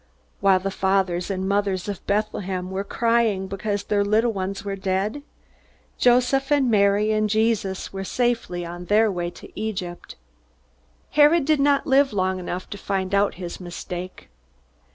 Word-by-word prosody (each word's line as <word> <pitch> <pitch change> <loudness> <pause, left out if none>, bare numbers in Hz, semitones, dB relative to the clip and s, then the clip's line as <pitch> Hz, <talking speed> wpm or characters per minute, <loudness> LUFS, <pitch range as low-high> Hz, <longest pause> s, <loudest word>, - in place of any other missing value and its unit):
While 195 -1 +4
the 195 +1 -3
fathers 190 -2 0
and 190 -1 -2
mothers 200 -2 0
of 200 -3 -5
Bethlehem 195 -3 -2
were 190 +1 -2
crying 230 -3 +1
because 200 +1 -3
their 205 -1 +1
little 220 +3 +2
ones 195 +1 -4
were 200 -1 -2
dead, 195 +7 -2 0.8
Joseph 250 +3 +3
and 275 -4 +3
Mary 205 0 +3
and 215 0 +1
Jesus 215 -4 0
were 195 0 -4
safely 230 -6 -1
on 175 +1 -7
their 215 +2 +3
way 175 -2 -2
to - - -13
Egypt. 190 -5 -5 1.0
Herod 295 +1 +5
did 305 -1 +2
not 280 0 +3
live 270 -1 +3
long 185 -1 0
enough 180 0 -5
to 205 - -6
find 190 -1 -2
out 200 0 +2
his 175 -2 -7
mistake. 180 0 -7
200 Hz, 155 wpm, -23 LUFS, 185-225 Hz, 1.0 s, Herod